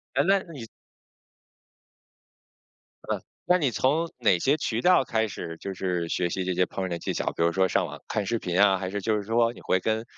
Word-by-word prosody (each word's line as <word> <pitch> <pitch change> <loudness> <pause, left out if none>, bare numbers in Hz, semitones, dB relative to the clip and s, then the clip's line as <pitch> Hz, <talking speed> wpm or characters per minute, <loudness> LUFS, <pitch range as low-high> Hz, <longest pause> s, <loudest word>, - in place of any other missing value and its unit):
哎， 140 - +4
那 195 0 +5
你 135 -8 -8 2.4
呃， - - -1 0.2
那 180 - +4
你 145 -8 +1
从 155 +8 +1
哪 105 -7 +4
些 140 - +2
渠 115 -6 -2
道 180 -3 +5
开 110 -3 0
始， 85 -4 -7
就 100 - -5
是 90 -2 -2
学 90 +1 -1
习 95 - -2
这 90 0 -1
些 90 +1 +2
烹 95 - -5
饪 - - -2
的 85 -1 -3
技 - - -3
巧， - - -3
比 - - 0
如 85 - +3
说 95 +2 +2
上 - - +1
网 - - -9
看 105 - -2
视 115 +3 0
频 90 -2 -1
啊， 100 -2 +5
还 95 0 -4
是 100 +1 -3
就 110 +2 +1
是 105 - -3
说 115 +2 +2
你 - - -14
会 95 - +1
跟， 110 +3 -1
105 Hz, 240 characters per minute, -26 LUFS, 90-120 Hz, 2.4 s, 那